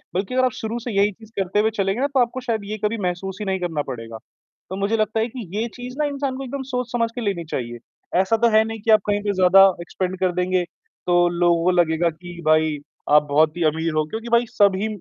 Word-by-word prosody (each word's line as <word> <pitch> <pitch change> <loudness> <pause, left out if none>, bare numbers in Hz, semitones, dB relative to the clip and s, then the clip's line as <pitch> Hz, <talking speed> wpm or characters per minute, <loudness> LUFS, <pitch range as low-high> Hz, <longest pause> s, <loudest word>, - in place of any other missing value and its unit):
बल्कि 195 +5 -2
अगर 255 0 +4
आप 250 - +1
शुरू 225 +1 -3
से 240 +1 -5
यही 200 +1 +4
चीज़ 220 +2 -17
करते 195 +2 0
हुए 220 - +3
चलेंगे 195 +2 0
ना 280 - +2
तो 275 -2 0
आपको 245 +1 +1
शायद 230 -4 -2
ये 215 +1 -4
कभी 230 +2 0
महसूस 190 +2 -4
ही 210 - -3
नहीं 190 -1 -1
करना 165 -4 -2
पड़ेगा। 115 -2 -7 0.5
तो 190 - -4
मुझे 200 +3 0
लगता 215 +1 0
है 225 - +1
कि 240 -4 -8
ये 230 +2 0
चीज़ 250 +1 -8
ना 300 - +2
इंसान 280 -2 -2
को 270 - -5
एकदम 275 +2 -5
सोच-समझ 240 -2 -1
के 245 - -4
लेनी 195 -6 -2
चाहिए। 120 -5 -5 0.4
ऐसा 225 +4 +1
तो 235 +1 +3
है 220 - +6
नहीं 225 0 -5
कि 225 - +1
आप 215 -2 +6
कहीं 205 0 +1
पे 205 - 0
ज़्यादा 190 +1 +6 0.2
स्पेंड 185 0 -3
कर 185 -1 +2
देंगे, 180 0 +1
तो 175 0 -1
लोगों 170 -1 +2
को 185 - +3
लगेगा 170 -1 +2
कि 175 +2 -11
भाई, 155 -1 +3 0.3
आप 150 0 +6
बहुत 155 +3 +3
ही 175 - 0
अमीर 160 +1 -2
हो 155 - +2
क्योंकि 225 +2 -5
भाई 235 +1 +4
सभी, 200 0 +2
195 Hz, 250 wpm, -22 LUFS, 175-230 Hz, 0.5 s, है